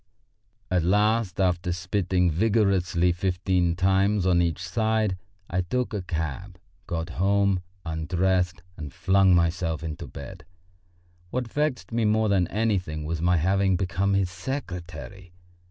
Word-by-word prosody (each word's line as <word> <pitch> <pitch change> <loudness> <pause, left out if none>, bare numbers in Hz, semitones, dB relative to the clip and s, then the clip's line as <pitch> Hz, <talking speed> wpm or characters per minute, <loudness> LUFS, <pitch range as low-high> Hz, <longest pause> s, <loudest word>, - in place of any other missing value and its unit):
At 90 -1 +3
last, 105 +2 +1
after 90 -1 +1
spitting 90 0 0
vigorously 95 -2 +2
fifteen 90 -1 0
times 95 +1 +2
on 90 -2 +4
each 85 -2 0
side, 110 0 +1 0.3
I 90 - 0
took 120 +8 -2
a 105 - -2
cab, 85 +1 -4 0.3
got 80 0 -3
home, 100 -1 +2 0.2
undressed 90 +2 0
and 75 -4 -7
flung 95 -1 +3
myself 85 -2 0
into 80 -2 -5
bed. 70 - -9 0.9
What 125 +2 -2
vexed 145 -10 -1
me 115 -1 +1
more 110 0 +2
than 95 -3 +2
anything 90 -9 -1
was 80 +1 -3
my 90 +1 +3
having 95 +3 +2
become 95 +2 0
his 95 -2 +1
secretary. 90 - -6
90 Hz, 130 wpm, -26 LUFS, 85-100 Hz, 0.9 s, on